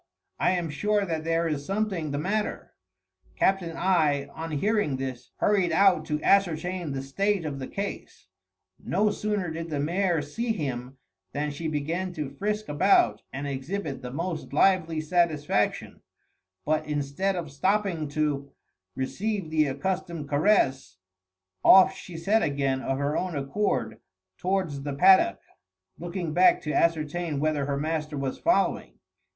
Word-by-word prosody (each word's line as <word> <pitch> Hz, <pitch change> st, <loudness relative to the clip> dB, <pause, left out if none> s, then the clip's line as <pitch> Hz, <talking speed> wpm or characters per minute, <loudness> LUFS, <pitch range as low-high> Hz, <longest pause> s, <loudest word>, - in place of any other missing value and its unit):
I -, -, +3 dB
am 175 Hz, -4 st, -2 dB
sure 205 Hz, +6 st, +1 dB
that 160 Hz, -3 st, -3 dB
there 165 Hz, 0 st, +1 dB
is 150 Hz, -3 st, -2 dB
something 195 Hz, -3 st, -2 dB
the 145 Hz, -, -2 dB
matter." 205 Hz, +7 st, -2 dB, 0.6 s
Captain 180 Hz, -4 st, +1 dB
I 155 Hz, -6 st, +2 dB
on 165 Hz, +1 st, -6 dB
hearing 160 Hz, -2 st, 0 dB
this 130 Hz, -2 st, -5 dB
hurried 195 Hz, -4 st, +2 dB
out 180 Hz, -2 st, +4 dB
to 150 Hz, 0 st, -1 dB
ascertain 180 Hz, -3 st, +1 dB
the 135 Hz, 0 st, -3 dB
state 195 Hz, +6 st, 0 dB
of 140 Hz, -3 st, -4 dB
the 130 Hz, -, -5 dB
case. 200 Hz, 0 st, -6 dB, 0.6 s
No 210 Hz, 0 st, +1 dB
sooner 205 Hz, -6 st, -2 dB
did 165 Hz, +1 st, -5 dB
the 150 Hz, -2 st, -2 dB
mare 170 Hz, +1 st, +1 dB
see 225 Hz, +11 st, -2 dB
him 130 Hz, -, -4 dB, 0.4 s
than 150 Hz, +1 st, -2 dB
she 160 Hz, +3 st, -4 dB
began 165 Hz, +5 st, -2 dB
to 150 Hz, -4 st, -4 dB
frisk 210 Hz, +8 st, -3 dB
about 145 Hz, -, +3 dB
and 140 Hz, +2 st, -5 dB
exhibit 140 Hz, +2 st, -4 dB
the 125 Hz, -, -6 dB
most 165 Hz, +4 st, -4 dB
lively 165 Hz, -1 st, +3 dB
satisfaction; 155 Hz, -, 0 dB, 0.6 s
but 155 Hz, 0 st, 0 dB
instead 150 Hz, +6 st, -1 dB
of 165 Hz, -5 st, -5 dB
stopping 185 Hz, +1 st, 0 dB
to 145 Hz, -2 st, -2 dB, 0.4 s
receive 195 Hz, +6 st, -3 dB
the 155 Hz, -1 st, +3 dB
accustomed 170 Hz, +2 st, -3 dB
caress, 145 Hz, -, +2 dB, 0.7 s
off 190 Hz, 0 st, +8 dB
she 180 Hz, -3 st, -9 dB
set 205 Hz, +7 st, +2 dB
again 140 Hz, -5 st, 0 dB
of 135 Hz, 0 st, -1 dB
her 145 Hz, +2 st, -1 dB
own 180 Hz, -3 st, -2 dB
accord 135 Hz, -, -1 dB, 0.4 s
towards 180 Hz, -7 st, -1 dB
the 145 Hz, 0 st, -4 dB
paddock, 185 Hz, -, +5 dB, 0.6 s
looking 175 Hz, -1 st, -4 dB
back 180 Hz, +2 st, +5 dB
to 150 Hz, -, -3 dB
ascertain 165 Hz, -1 st, 0 dB
whether 150 Hz, -2 st, 0 dB
her 140 Hz, -1 st, -1 dB
master 155 Hz, 0 st, -2 dB
was 135 Hz, -1 st, -3 dB
following. 335 Hz, +2 st, +1 dB
160 Hz, 145 wpm, -27 LUFS, 145-190 Hz, 0.7 s, off